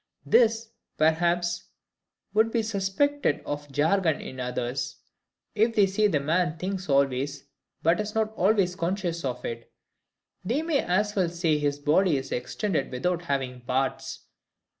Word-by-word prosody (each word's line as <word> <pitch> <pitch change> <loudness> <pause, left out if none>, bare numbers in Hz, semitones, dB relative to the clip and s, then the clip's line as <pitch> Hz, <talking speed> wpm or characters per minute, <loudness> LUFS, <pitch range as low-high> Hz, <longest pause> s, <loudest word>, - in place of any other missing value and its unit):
This, 225 -1 +3 0.3
perhaps, 170 +2 +1 0.7
would 220 +2 +4
be 230 -1 +1
suspected 215 - 0
of 145 0 -5
jargon 160 +3 +2
in 130 - -8
others. 125 +1 -3 0.6
If 225 +2 +2
they 205 - +6
say 205 +2 +2
the 160 -8 +1
man 160 +2 0
thinks 185 +1 -4
always, 140 0 +1 0.4
but 165 +4 +3
is 210 0 -3
not 220 0 0
always 195 -2 +2
conscious 175 -1 -2
of 125 -2 -3
it, 115 0 -6 0.7
they 250 +11 0
may 320 -4 +1
as 205 +4 0
well 185 -4 +2
say 165 -3 +1
his 145 -1 0
body 150 +3 +3
is 135 0 -6
extended 165 - -2
without 170 +7 -1
having 130 -4 -2
parts. 130 +2 -2
175 Hz, 140 wpm, -27 LUFS, 140-205 Hz, 0.7 s, they